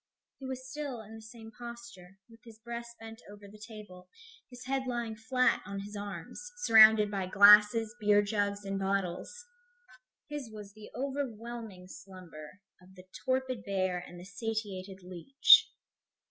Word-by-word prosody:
He 265 - -7
was 260 0 -6
still 280 -3 -6
in 215 +1 -13
the 225 - -10
same 225 0 -12
posture, 235 -6 -11
with 230 -1 -18
his 230 -2 -14
breast 235 +1 -8
bent 225 0 -11
over 205 0 -13
the 210 +1 -15
table, 210 -5 -12 0.4
his 250 0 -12
head 265 0 -2
lying 235 -3 -3
flat 250 +4 +1
on 200 +1 -6
his 205 +1 -9
arms, 200 - -7 0.2
surrounded 220 -2 +7
by 195 -2 -3
glasses, 210 +3 +6
beer 205 -1 +4
jugs 205 -1 -2
and 195 0 -3
bottles. 195 - -3 0.8
His 295 -5 -6
was 210 -2 -11
the 215 0 -13
overwhelming 235 -7 -5
slumber 185 -2 -12 0.2
of 185 +1 -19
the 185 -1 -14 0.2
torpid 260 -1 -1
bear 185 -3 -1
and 175 0 -11
the 175 - -11
satiated 200 -3 -5
leech. 185 +10 +5
215 Hz, 150 wpm, -30 LUFS, 195-235 Hz, 0.8 s, surrounded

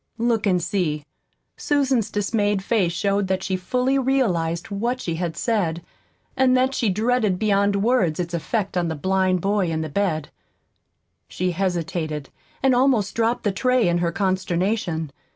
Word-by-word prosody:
Look 230 -2 +1
and 180 -2 +3
see! 170 -5 -1 0.5
Susan's 265 -7 +1
dismayed 205 -1 0
face 195 -5 +1
showed 200 +2 0
that 190 0 -1
she 190 0 -1
fully 250 +8 0
realized 190 -11 0
what 235 +6 -1
she 170 - -3
had 170 0 -3
said, 175 -8 -1 0.5
and 260 -1 +4
that 260 +1 +2
she 235 -5 +1
dreaded 215 -1 +1
beyond 200 -1 +2
words 210 -10 +2
its 175 -1 -3
effect 195 +4 -2
on 175 -1 +1
the 160 - -2
blind 185 +2 +1
boy 200 -1 +1
in 160 -1 -1
the 155 - -4
bed. 160 -4 -1 1.0
She 180 0 -2
hesitated, 165 -5 -2 0.3
and 265 -1 +4
almost 245 -6 +2
dropped 230 +1 0
the 205 - +1
tray 250 +2 +2
in 175 0 +2
her 170 -1 0
consternation. 185 -3 -1
195 Hz, 155 wpm, -23 LUFS, 175-230 Hz, 1.0 s, and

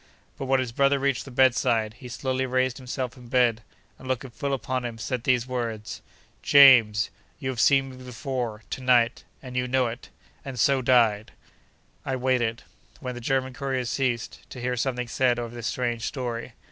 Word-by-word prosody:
But, 135 - -5
when 135 0 +3
his 130 -3 -2
brother 140 +3 +3
reached 135 -4 0
the - - -9
bed 130 0 +4
side, 115 -4 0
he 125 - -9
slowly 130 +2 -2
raised 130 0 0
himself 130 -2 -4
in 125 -1 -13
bed, 120 -2 +2 0.4
and 130 - -11
looking 130 0 -3
full 140 +4 -3
upon 130 -1 -2
him, 120 -2 -5
said 125 +1 -3
these 125 -2 +2
words: 115 -4 -4 0.4
'JAMES, 120 -7 +6 0.3
YOU 130 - -4
HAVE 130 -3 -4
SEEN 135 +1 +4
ME 130 - -12
BEFORE, 125 -3 -5
TO - - -4
NIGHT—AND 125 +1 0
YOU 125 0 0
KNOW 130 0 +2
IT!' 115 +3 -9 0.3
And 130 -3 -6
so 135 +3 +3
died! 115 -4 +3 0.7
I 130 - -2
waited, 125 -3 0 0.4
when 125 -2 -5
the 120 - -8
German 130 +1 0
courier 130 -1 -2
ceased, 120 -2 -2
to 125 - -9
hear 125 +1 -1
something 125 0 -2
said 120 0 +1
of 120 -1 -4
this 120 -1 -5
strange 120 -2 -2
story. 120 -2 -4
125 Hz, 185 wpm, -26 LUFS, 120-130 Hz, 0.7 s, JAMES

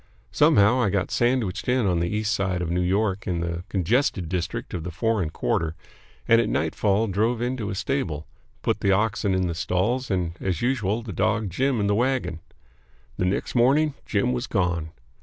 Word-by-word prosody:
Somehow 105 +6 +4
I 105 - +2
got 95 -1 -1
sandwiched 120 -5 0
in 125 -2 +2
on 90 -3 +2
the 85 +1 0
East 105 +1 0
Side 95 -3 -1
of 85 - -3
New 90 +1 +1
York 95 +2 0
in 85 -2 -1
the 85 0 -3
congested 95 - +1
district 85 -2 -3
of 85 - -3
the 90 - -4
foreign 95 0 0
quarter 80 +1 -1 0.5
and 115 0 +6
at - - -1
nightfall 105 +1 +1
drove 110 +4 0
into 120 -3 -2
a 95 - -3
stable, 95 - -2 0.4
put - - 0
the 100 - +2
oxen 105 0 +1
in 95 0 +1
the 85 - -1
stalls 95 +9 -1
and, 90 -4 -1
as 95 -4 -1
usual, 115 -3 0
the 110 -4 -6
dog 110 +2 0
Jim 130 +5 +1
in 100 - +1
the 100 - +2
wagon. 125 -6 0 0.8
The 90 - 0
next 90 - -1
morning 140 +5 +3
Jim 120 +4 +1
was 125 0 -2
gone. 90 -5 0
100 Hz, 190 wpm, -25 LUFS, 90-120 Hz, 0.8 s, and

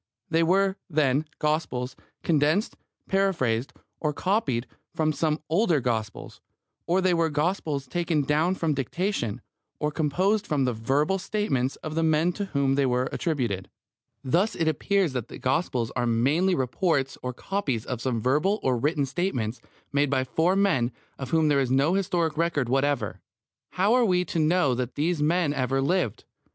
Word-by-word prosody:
They 165 0 +3
were, 190 +3 +2
then, 150 -2 +2
Gospels 135 -5 -1 0.3
condensed, 155 +6 +2 0.3
paraphrased, 140 -12 +1 0.3
or 150 -2 -1
copied 145 - 0 0.3
from 155 -1 +1
some 155 0 0
older 170 -1 +2
Gospels, 110 -4 -3 0.5
or 180 +3 +2
they 185 -1 +3
were 165 -1 +2
Gospels 150 -2 -1
taken 165 +1 0
down 155 +6 +1
from 165 -4 0
dictation, 140 - -2 0.4
or 150 0 -1
composed 185 +8 +1
from 140 -3 +1
the 125 - 0
verbal 140 - 0
statements 180 -10 -1
of 155 - -4
the 165 - 0
men 160 +2 +2
to 200 - -3
whom 140 -7 +1
they 135 -1 +2
were 125 +1 0
attributed. 120 - -2 0.5
Thus 175 - +1
it 165 - 0
appears 180 +1 +1
that 125 -4 -3
the - - -9
Gospels 130 -4 -1
are 120 -1 0
merely 145 +11 +2
reports 135 0 0
or 125 - -3
copies 135 - -3
of 125 -3 -4
some 125 -3 -1
verbal 150 - +1
or 130 -2 +2
written 145 +2 +1
statements 130 - -2 0.3
made 145 0 +2
by 130 -1 +1
four 165 +8 +1
men 165 -12 +2 0.3
of 135 -2 -5
whom 160 0 +3
there 145 -2 +3
is 130 -2 0
no 140 +6 +3
historic 175 -4 0
record 160 -6 +1
whatever. 140 +2 0 0.5
How 195 +5 +2
are 250 0 +4
we 180 -3 +2
to 170 - -2
know 155 -3 +3
that 125 0 -3
these 160 +1 0
men 160 0 +2
ever 135 -1 0
lived? 140 - 0
150 Hz, 165 wpm, -26 LUFS, 130-175 Hz, 0.5 s, are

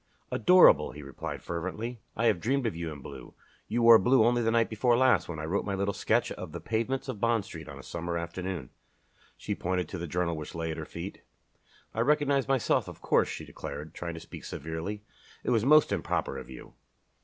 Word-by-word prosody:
"Adorable," 180 - +6
he 75 - -9
replied, 70 0 -6
fervently. 105 +8 -4 0.2
"I 115 - +1
have 110 -6 +3
dreamed 135 +2 +1
of 110 - -1
you 85 -1 -4
in 70 -3 -9
blue. - - -10 0.3
You 115 +2 0
wore 115 -1 +9
blue 125 +2 +4
only 120 +1 +3
the 115 - +2
night 115 0 +3
before 120 +2 +2
last, 130 -6 +3
when 85 - -4
I 80 - -4
wrote 95 +6 0
my 100 -1 -2
little 100 +1 -1
sketch - - +1
of 75 - -7
'The 85 - -5
Pavements 115 - -2
of 125 -6 -5
Bond 115 -3 +2
Street 80 -8 -9
on 70 - -9
a 65 - -11
Summer 85 0 -4
Afternoon.'" 85 -3 -5 0.7
She - - -3
pointed 90 -1 -1
to 95 - -5
the 85 - -4
journal 85 +1 -1
which 75 +1 -7
lay 80 -1 -2
at 80 - -5
her - - -5
feet. - - -7 0.7
"I 110 - -4
recognized 140 +1 +2
myself, 135 -3 +2
of - - -9
course," - - +3
she - - -6
declared, 75 +3 -7
trying 85 -1 -5
to - - -6
speak - - -10
severely. 80 +7 -5 0.4
"It - - 0
was 115 -2 +2
most 155 +2 +6
improper - - -1
of - - -11
you." 65 - -11
100 Hz, 215 wpm, -29 LUFS, 85-120 Hz, 0.7 s, wore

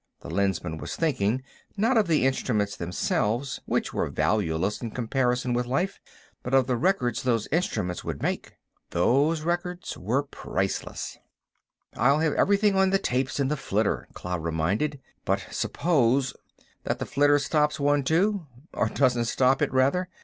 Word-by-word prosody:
the - - -8
Lensman 90 -4 -1
was - - -5
thinking, 130 -6 0 0.3
not 230 +6 +2
of 215 -4 +3
the 155 -5 +3
instruments 105 -6 0
themselves, 105 +9 -1
which - - -1
were - - -1
valueless 90 +6 0
in 115 - -3
comparison 125 +1 0
with 120 0 0
life, 175 +10 -1 0.4
but 125 +2 -1
of 135 -2 +5
the 125 -1 0
records 125 - +1
those 120 -4 +1
instruments 105 - -1
would - - -4
make. - - -3 0.4
Those 140 - +2
records 175 +1 -2
were 120 +9 0
priceless. 140 - -4 0.8
"I'll 135 +5 +4
have 155 -1 +1
everything 200 0 +3
on 190 0 +4
the 195 - +3
tapes 130 -7 -1
in 140 - +2
the 150 - +1
flitter," 110 -6 -1
Cloud 90 -2 -4
reminded. 95 - -1 0.2
"But - - 0
suppose...." 135 -5 +1 0.5
"That - - -1
the - - -4
flitter 145 +1 +3
stops 150 +1 +1
one, 145 0 +3
too—or 160 - -1
doesn't 125 -3 +2
stop 130 +3 +2
it, - - +1
rather? 140 +8 +2
130 Hz, 150 wpm, -26 LUFS, 110-155 Hz, 0.8 s, of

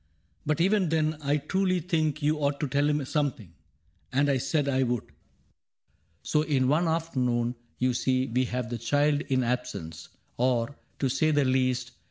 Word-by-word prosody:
But 150 0 +1
even 190 0 +3
then, 155 -1 +1
I 145 +1 +1
truly 185 +5 0
think 155 -4 -1
you 150 +1 +2
ought 140 -1 0
To 150 - 0
tell 145 +3 +1
him 150 -2 0
something.' 130 - -2 0.3
— 85 +2 -40
And 140 +2 +2
I 135 - +2
said 145 +2 0
I 135 -1 +1
would. 120 -3 0 0.7
" 80 +1 -43
So 150 - +1
in 140 -4 +1
one 155 +5 +2
afternoon 125 -8 0 0.2
you 125 0 +1
see 130 +1 +1
we 130 +1 0
have 125 -1 -3
The 120 - -3
child 145 +5 +2
in 130 -4 0
absence 120 -10 -4
— - - -41
or, 125 +1 +1 0.2
to 135 - 0
say 155 +5 +1
the 145 -2 +3
least. 130 -1 +1
140 Hz, 185 wpm, -27 LUFS, 125-150 Hz, 0.7 s, even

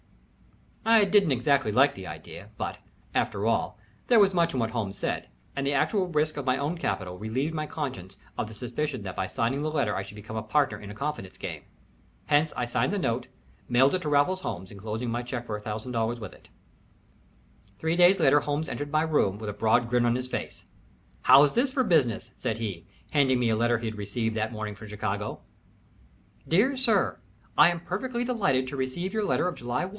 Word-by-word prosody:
I 225 -2 +6
didn't 200 -5 +4
exactly 130 -2 +2
like 135 +6 +5
the 95 -1 -8
idea, 80 +5 -9
but, - - -4 0.3
after 100 +1 0
all, 115 -2 0 0.3
there 235 -2 +6
was 195 -2 +5
much 170 -4 +2
in - - 0
what 110 -1 0
Holmes 100 -4 -3
said, - - -3 0.3
and 140 - -2
the 140 +1 +1
actual 190 +6 +2
risk 155 -2 0
of 145 - -3
my 130 0 +3
own 145 +5 -1
capital 90 - -3
relieved 130 +9 -2
my 155 -1 -2
conscience 100 - -5 0.2
of - - -2
the 110 - -10
suspicion 130 +1 -3
that 95 -2 -6
by 95 - -1
signing 125 +8 -1
the 155 - -1
letter 140 -9 0
I - - -1
should 95 +2 -10
become 110 +2 -7
a - - -1
partner 110 -1 +1
in 100 - -9
a 105 - -8
confidence 140 -7 -4
game. - - -5 0.6
Hence 150 +1 +3
I 125 - 0
signed 125 +3 0
the 205 - 0
note, 120 -9 -1 0.4
mailed 130 +3 +5
it 185 - 0
to 150 - -2
Raffles 150 +6 +2
Holmes, 95 - -5
enclosing 110 +4 -4
my 120 +1 -1
check 120 0 -5
for 105 -2 -4
$1000 115 +2 -2
with 105 -4 -7
it. - - -19 1.3
Three 160 +8 0
days 180 +2 +6
later 145 -2 +5
Holmes 145 +2 -2
entered 145 0 -4
my 155 +1 +3
room 145 -11 +1
with 105 -1 -4
a - - -9
broad 110 +3 +2
grin 120 0 +2
on 120 - +2
his 130 0 -3
face. - - -5 0.6
"How's 140 +1 +7
this 260 +3 +2
for 260 -1 +2
business?" 155 - +1
said 110 - -2
he, 100 -6 -5 0.2
handing 135 -4 +3
me 120 -2 +2
a - - +3
letter 120 +1 +2
he 115 - -6
had 110 -1 -4
received 110 +2 -2
that 110 0 -1
morning 110 -2 -4
from 105 +2 -11
Chicago. 105 0 -3 1.1
"DEAR 220 +12 +3
SIR, 225 - +1 0.4
I - - +7
am 170 -1 -3
perfectly 235 +8 -3
delighted 195 - +1
to 140 - -6
receive 140 +8 -3
your 220 -1 0
letter 200 - +1
of 180 - -1
July 120 +7 -2
1. - - -6
130 Hz, 210 wpm, -27 LUFS, 110-155 Hz, 1.3 s, How's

